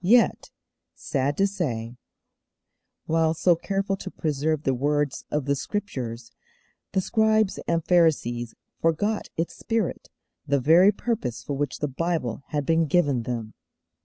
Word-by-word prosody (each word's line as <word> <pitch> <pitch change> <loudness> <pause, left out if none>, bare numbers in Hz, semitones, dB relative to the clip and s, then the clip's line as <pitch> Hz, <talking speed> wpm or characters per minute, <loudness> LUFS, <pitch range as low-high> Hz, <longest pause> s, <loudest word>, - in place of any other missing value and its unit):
Yet, 230 +6 +4 0.5
sad 140 +1 -1
to 195 - +4
say, 125 - -3 1.1
while 160 0 +2
so 170 +2 +4
careful 195 +3 -1
to 190 - -6
preserve 155 -2 -1
the 135 - +2
words 145 +2 0
of 150 -2 -1
the 140 0 +1
Scriptures, 125 - -4 0.6
the 190 - +2
Scribes 220 0 +2
and 165 -1 0
Pharisees 130 -9 +2 0.2
forgot 205 +7 0
its 165 +1 -2
spirit, 225 -5 -2 0.4
the 140 0 +2
very 165 +9 +6
purpose 210 - -3
for 145 - -4
which 140 -1 -2
the 150 - +1
Bible 145 -4 -2
had 145 -2 -2
been 165 +1 +2
given 145 -6 +2
them. 115 -2 -4
155 Hz, 135 wpm, -25 LUFS, 135-185 Hz, 1.1 s, very